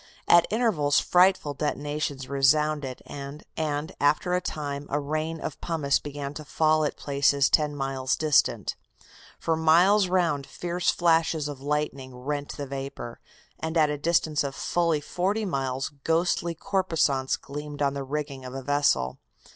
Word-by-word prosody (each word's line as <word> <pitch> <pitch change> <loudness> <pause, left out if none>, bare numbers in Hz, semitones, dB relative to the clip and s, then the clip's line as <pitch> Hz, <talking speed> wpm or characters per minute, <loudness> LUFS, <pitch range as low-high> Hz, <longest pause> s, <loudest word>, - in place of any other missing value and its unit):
At 170 -1 +6
intervals 200 -11 +2
frightful 180 -4 +3
detonations 145 -2 -3
resounded, 140 0 +1
and 140 +1 -8 0.6
after 150 +5 +2
a 180 - +2
time 145 -3 -4
a 145 - 0
rain 155 +3 -3
of - - -6
pumice 150 -5 +1
began 145 -1 -6
to 155 - -7
fall 155 +1 +2
at 150 - -2
places 140 -1 +2
ten 150 -1 +3
miles 135 -2 -1
distant. 155 -2 +2 0.6
For 165 - 0
miles 175 +6 +5
round 170 -6 +1
fierce 175 0 -2
flashes 165 -3 +2
of 145 -3 -7
lightning 140 -3 -2
rent 145 +3 -4
the 145 - -4
vapor, 135 -3 -6 0.4
and 160 +1 -2
at 155 -2 +4
a 150 - -2
distance 160 -1 +1
of 140 -1 -4
fully 170 -3 0
forty 195 +8 -1
miles 135 -6 -2
ghostly 170 +1 +1
corposants 165 -8 0
gleamed 145 +1 -5
on 140 -1 +1
the 140 -1 -4
rigging 140 -1 -4
of 130 0 -8
a 135 - -5
vessel. 140 - +1
150 Hz, 145 wpm, -26 LUFS, 140-165 Hz, 0.6 s, At